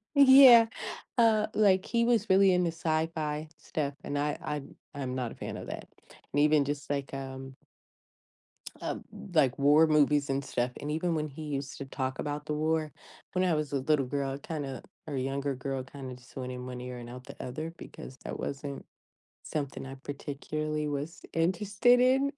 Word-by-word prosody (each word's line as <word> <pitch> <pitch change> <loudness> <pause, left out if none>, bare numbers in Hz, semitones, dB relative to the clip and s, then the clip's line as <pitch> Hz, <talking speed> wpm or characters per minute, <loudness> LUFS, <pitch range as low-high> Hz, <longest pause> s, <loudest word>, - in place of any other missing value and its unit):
yeah, 265 -4 +9 0.5
uh, 220 -2 +4
like, 190 -3 +4
he 235 -1 +1
was 230 -3 +2
really 190 0 +6
into 180 -1 +2
sci-fi 155 -1 -1
stuff 145 -2 -3
and 145 - -3
I 145 +1 0
I'm 150 -2 -5 0.2
I'm 130 -3 -4
not 125 -3 -2
a - - -10
fan - - -6
of - - -8
that - - -6 0.4
and, 145 - +1
even 150 -1 +5
just, 145 0 -4
like, 140 -1 -2
um 135 -1 -6 1.3
Uh, - - -2
b - - -9 0.3
like, 130 -2 +3
war 150 +3 +6
movies 150 -2 +3
and 135 +1 0
stuff, 125 -1 -1
and 150 - -3
even 165 +2 0
when 155 -1 -1
he 145 +2 -10
used 140 -2 -4
to 140 - -5
talk 130 -1 -3
about 150 0 -3
the 150 - -2
war, 155 0 0 0.4
when 185 - +2
I 180 -2 +3
was 150 -2 -1
a 140 - +1
little 140 0 +2
girl, 135 +1 -2
I - - -4
kinda 140 -3 -5 0.2
or 150 - -3
younger 135 +1 -1
girl 135 0 -3
kinda 130 -1 -8
just 125 +1 -18
went 130 -1 -4
in 125 0 -6
one 125 -1 -6
ear 125 0 -6
and 120 -1 -8
out 125 +1 -9
the - - -9
other, 155 +6 -5
because 130 - -10
that - - -5
wasn't 140 0 -5 0.6
something 140 -3 -4
I 135 0 -7
particularly 150 +2 -4
was 145 +2 -4
interested 195 +8 +3
in, 265 +3 +4
145 Hz, 190 wpm, -30 LUFS, 135-165 Hz, 1.3 s, yeah